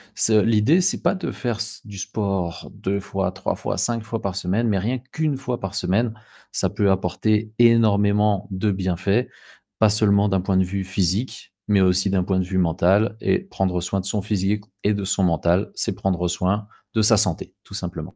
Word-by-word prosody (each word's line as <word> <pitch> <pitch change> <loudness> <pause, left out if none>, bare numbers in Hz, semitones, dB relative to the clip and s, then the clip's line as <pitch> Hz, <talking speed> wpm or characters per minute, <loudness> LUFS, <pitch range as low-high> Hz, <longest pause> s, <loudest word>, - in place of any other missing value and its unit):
Ce 110 - +2
l'idée, 115 - +3
c'est - - +1
pas - - +3
de 185 - -4
faire 120 -3 -3
s 110 -2 -5
du 105 -2 -10
sport 100 -4 -3
2 100 +1 -2
fois, 95 -1 -2
3 95 0 -3
fois, - - -4
5 115 -2 -1
fois 115 0 -4
par 95 -2 -3
semaine, 100 +5 0
mais 100 -3 +1
rien 120 +7 -1
qu'1 155 -3 -1
fois 125 -2 -4
par 95 +1 -5
semaine, 105 +4 0 0.4
ça - - 0
peut 100 -1 +1
apporter 110 +2 0
énormément 105 -3 +3
de 100 +2 0
bienfaits, 95 +5 0 0.5
pas 110 - +5
seulement 105 -1 +3
d'un 95 -1 +1
point 95 0 0
de 95 - +4
vue 95 +1 -3
physique, 95 +4 -2
mais 105 -2 +3
aussi 95 +1 +3
d'un 95 -1 +1
point 95 0 0
de 90 - 0
vue 95 +1 -3
mental 95 +5 +2
et - - +2
prendre 95 - -2
soin 95 +2 -2
de 95 - -5
son 100 +1 -1
physique 100 0 -1 0.2
et 105 - +3
de 100 - -3
son 95 0 0
mental, 85 +2 +1
c'est - - -1
prendre 95 -3 -1
soin 95 +4 -1 0.3
de 110 - +3
sa 110 +1 +6
santé, 95 -6 0
tout - - -15
simplement. - - -6
100 Hz, 200 wpm, -22 LUFS, 95-110 Hz, 0.5 s, sa